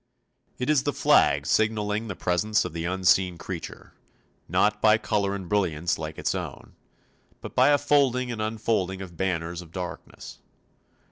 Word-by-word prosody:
It 125 - -3
is 150 -3 +3
the 145 +1 -2
flag - - +3
signalling 110 0 0
the 100 - -5
presence 90 +5 0
of 90 - -6
the 85 0 -4
unseen 90 0 +2
creature; 85 -1 -8 0.6
not 105 0 +2
by 110 0 +5
colour 100 -2 -1
and 95 -3 -7
brilliance 85 -5 0
like 80 -1 -6
its - - -1
own, - - -7 0.7
but - - -9
by - - +5
a 145 - +5
folding 135 -4 +2
and 115 -2 -4
unfolding 110 -4 -1
of 90 -2 -11
banners 85 -2 -2
of 85 -2 -14
darkness. 90 0 -8
100 Hz, 155 wpm, -26 LUFS, 90-110 Hz, 0.7 s, by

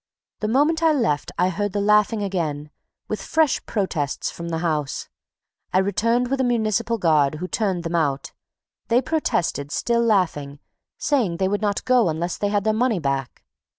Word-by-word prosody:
The 215 - -1
moment 295 +8 +2
I 325 -1 +4
left, 225 - 0
I 180 +1 +3
heard 205 +2 -2
the 205 - 0
laughing 210 +1 +3
again, 155 -6 -3 0.4
with 215 - -3
fresh 315 -3 +1
protests 170 -9 -2
from 170 0 -7
the 165 - -1
house. 150 -4 -2 0.6
I - - +2
returned 230 +6 +1
with 275 -1 +1
a - - +2
municipal 230 -1 0
guard, 155 -6 +3
who 180 +4 -5
turned 190 -4 -1
them 165 0 -4
out. 145 -5 0 0.6
They 240 +1 +4
protested, 170 - -1
still 235 +6 +1
laughing, 175 -11 +1 0.4
saying 230 - 0
they 190 - +1
would 205 +2 -1
not 205 -2 -1
go 250 -7 +4
unless 165 +2 -3
they 205 - 0
had 205 -1 0
their 215 0 +2
money 230 -1 +1
back. 140 -5 -3
200 Hz, 175 wpm, -23 LUFS, 165-230 Hz, 0.6 s, I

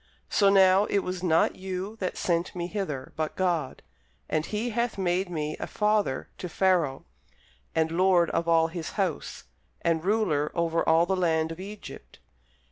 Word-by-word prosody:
So 200 -2 +4
now 195 0 +5
it 200 -2 0
was 185 0 -4
not 165 -3 +2
you 190 +2 -5
that 185 -4 -3
sent 170 0 -1
me 175 -1 -3
hither, 175 -9 -4
but 155 -1 -3
God: 170 -7 -1 0.4
and 155 0 -1
he 220 +3 -2
hath 235 0 -1
made 185 0 0
me 155 -3 -3
a - - -4
father 210 -9 0
to 180 - -5
Pharaoh, 170 -7 +1 0.7
and 160 0 +1
lord 180 -1 +3
of 170 - -1
all 165 -1 +4
his 165 -1 -6
house, 190 -6 -2 0.4
and 165 -1 +1
ruler 185 -8 +1
over 170 -1 +1
all 165 +1 +5
the 190 +2 0
land 160 -3 +1
of 165 - -8
Egypt. 205 +2 -10
180 Hz, 165 wpm, -27 LUFS, 160-195 Hz, 0.7 s, now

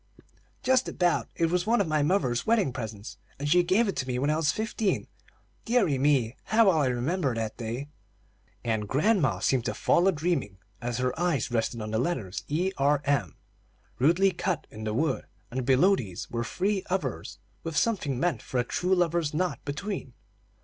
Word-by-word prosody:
"Just 260 -1 +3
about. 175 -1 +1
It 165 -1 +1
was 180 +1 0
one 235 +2 +3
of 200 - +1
my 155 -1 +1
mother's 145 -7 +1
wedding 215 - +2
presents, 110 -4 -6 0.2
and 145 - -3
she 175 +4 +5
gave 195 +6 +2
it 195 - -2
to 130 - -2
me 125 -1 -1
when 140 +4 +1
I - - +2
was 155 -1 +2
fifteen. 215 -2 -1 0.6
Deary 205 - +2
me, 130 -4 +2
how 225 +1 +4
well 170 -5 +4
I 140 - +2
remember 130 +3 0
that 110 -1 -3
day!" 120 +4 -4 0.8
and 110 -3 -1
grandma 145 - +2
seemed 125 +6 +1
to - - -2
fall 175 +2 +3
a - - +6
dreaming 155 - -1 0.2
as 120 -1 -2
her 125 0 0
eyes 165 -10 0
rested 115 -1 -1
on 105 - -5
the 110 - 0
letters 120 - -2
E. 175 +6 0
R. 145 +1 +3
M. 120 - 0 0.6
rudely 170 +8 +4
cut 185 -2 -2
in 110 0 -7
the 105 - -1
wood, 150 +1 0 0.3
and 130 0 -3
below 145 +10 +5
these 100 - -6
were 115 0 -1
three 190 - -1
others 130 - -3 0.3
with 165 -3 -4
something 145 - 0
meant 160 -7 0
for 125 - -2
a - - +2
true 180 +9 0
lover's 170 -4 +1
knot 180 +2 0
between. 150 -1 -4
145 Hz, 190 wpm, -27 LUFS, 120-180 Hz, 0.8 s, a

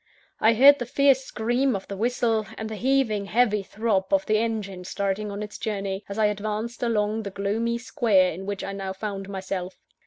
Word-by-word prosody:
I 225 +1 +4
heard 280 +4 +8
the 245 - -4
fierce 275 0 +4
scream 245 +2 0
of 195 - -6
the 200 - -5
whistle, 225 0 0
and 220 - -4
the 220 - -5
heaving, 235 -4 +1
heavy 210 -1 +2
throb 205 +1 -1
of 290 0 +3
the 215 0 +2
engine 210 -5 -3
starting 200 +2 -2
on 200 +1 -4
its 210 - -8
journey, 200 -2 -3
as 200 - -5
I 220 - +3
advanced 215 +3 -2
along 220 -2 0
the 205 - -5
gloomy 210 +4 -1
Square 210 -6 +2
in 190 +4 -7
which 200 -1 -3
I 195 - -4
now 195 -1 -4
found 195 -1 -5
myself. 190 -1 -4
215 Hz, 195 wpm, -25 LUFS, 195-235 Hz, -, heard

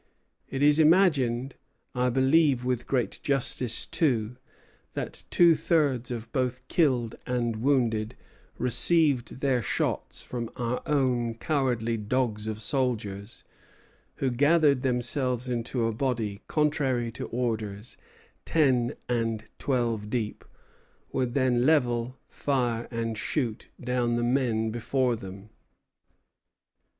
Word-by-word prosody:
It 135 +1 -2
is 150 +1 +5
imagined 145 -7 +3 0.4
(I 125 0 +1
believe 135 0 +3
with 125 -2 -1
great 125 -3 -1
justice, 130 -4 +2
too) 125 -7 0 0.6
that - - -5
two 170 -1 +6
thirds 145 -7 +1
of 115 -2 -6
both 130 0 -2
killed 125 -9 +1
and 120 -3 -1
wounded 115 -4 +1 0.4
received 135 0 +3
their 130 -3 +2
shots - - -2
from 120 -2 -5
our 120 0 -2
own 125 -6 +1
cowardly 120 -4 -1
dogs 110 -1 -1
of 110 0 -4
soldiers, 105 -5 -2 0.7
who 130 - -1
gathered 145 +1 +3
themselves 125 0 0
into 120 0 -1
a 115 - 0
body, 110 -5 -2
contrary 135 -6 0
to - - -6
orders, 110 -3 -3 0.5
ten 130 -7 +2
and 115 -2 -1 0.2
twelve 115 -6 -1
deep, 110 -3 -3 0.7
would 125 -2 -1
then 130 -3 +2
level, 125 -4 +1
fire, 120 -4 -1
and 115 -2 -3
shoot 120 -8 -2
down 125 -1 0
the 120 - 0
men 120 -3 +1
before 120 +2 0
them." 100 0 -10
125 Hz, 115 wpm, -27 LUFS, 115-135 Hz, 0.7 s, two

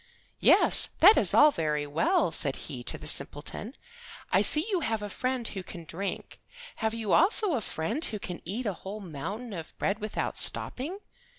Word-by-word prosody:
"Yes, - - +5
that 410 +6 +8
is - - +2
all 300 +1 +6
very 150 - -2
well," 290 - +1
said 140 -4 -1
he 130 -5 -7
to - - -4
the - - -12
simpleton. 155 - -2 0.6
"I - - +4
see 305 +2 +2
you 375 - +1
have 225 -8 -2
a 205 - -6
friend 255 0 -2
who 195 - -6
can 175 -2 -10
drink. 195 +6 -6 0.4
Have 220 0 -1
you 220 -3 -2
also 385 +2 +5
a 245 - -1
friend 215 - -3
who 215 - -3
can 180 -3 -7
eat 220 +8 -4
a 205 - -1
whole 195 +4 -8
mountain 200 - -7
of 165 -4 -9
bread 200 +2 -1
without 215 0 -3
stopping? 305 +10 +1
210 Hz, 185 wpm, -28 LUFS, 165-255 Hz, 0.6 s, that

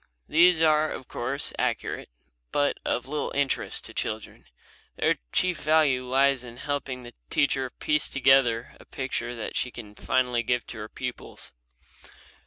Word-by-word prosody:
These 170 +1 +5
are, 155 -1 +4
of 130 - -7
course, 135 +4 -2
accurate, - - -2 0.4
but 145 0 +1
of 120 - -1
little 145 +2 -3
interest 140 -1 0
to - - -7
children. - - -4 0.5
Their - - +1
chief 180 -2 +1
value 155 -5 +3
lies 135 0 +3
in 120 -1 -10
helping 135 -2 -3
the 120 - -10 0.2
teacher 135 -2 +1
to - - -40
piece 150 -1 0
together 130 -3 +3
a - - -15
picture 120 -2 -3
that 115 - -5
she 125 - 0
can 110 -4 -10
finally 125 +1 +1
give 120 +1 0
to 115 - -7
her 105 +1 -6
pupils. 125 -1 -7
130 Hz, 155 wpm, -27 LUFS, 120-145 Hz, 0.5 s, These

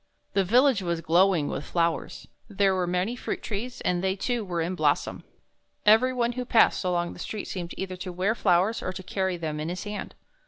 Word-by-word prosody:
The 195 - +3
village 245 +3 +4
was 170 -2 -1
glowing 170 -1 +3
with - - -3
flowers. 170 0 -1 0.2
There 200 -1 +2
were 185 -1 0
many 180 +6 0
fruit - - -4
trees, 235 +4 -5
and 180 0 0
they, 190 0 +1
too, 240 +3 -1
were 175 -4 -3
in 165 +3 -1
blossom. 185 - 0 0.6
Every 225 +5 +6
one 240 -2 0
who 250 +1 -4
passed 230 -4 +3
along 175 -1 0
the - - -13
street 210 +3 -5
seemed 175 -2 -5
either 185 -1 -4
to 185 0 -6
wear 185 +5 0
flowers 195 0 +2
or 185 - -3
to 185 +1 -7
carry 190 0 -1
them 155 -2 -4
in 155 +2 -3
his 180 +1 -4
hand. 210 0 -6
190 Hz, 205 wpm, -26 LUFS, 175-215 Hz, 0.6 s, Every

